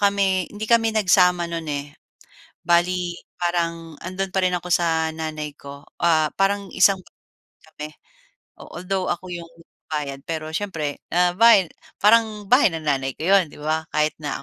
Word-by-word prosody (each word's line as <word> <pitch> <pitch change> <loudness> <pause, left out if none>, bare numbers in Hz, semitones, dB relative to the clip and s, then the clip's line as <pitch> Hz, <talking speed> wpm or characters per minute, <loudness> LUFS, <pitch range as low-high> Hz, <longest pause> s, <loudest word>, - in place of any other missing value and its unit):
kami, 195 -3 +2
hindi 210 +1 -6
kami 225 -1 +3
nagsama 180 -4 +4
no'n 165 -2 -4
eh. 140 -1 -3 0.8
Bale 175 0 +1 0.2
parang 170 -2 -2
'andon 185 +2 -3
pa 190 - +1
rin 180 - +1
ako 175 - -9
sa 160 -2 +1
nanay 155 -1 -5
ko. 140 0 -11 0.2
Ah 160 -3 +3
parang 200 0 +1
isang 190 0 +4 0.7
kami. 150 0 -8 0.7
A - - -10
although 185 +1 -3
ako 185 +2 -4
'yung 170 -1 -7
nagbabayad 150 -4 -7
pero 160 -1 -3
siyempre 160 -6 -3
ah 180 0 +3
bale 210 -5 +6 0.3
parang 215 0 +4
bahay 250 +2 +5
ng 165 -2 -6
nanay 135 -2 0
ko 160 - -5
yun 190 -5 +4
'di - - -14
ba 155 +1 -1
kahit 150 0 +2
na 145 -1 -4
175 Hz, 160 wpm, -22 LUFS, 155-195 Hz, 0.8 s, bale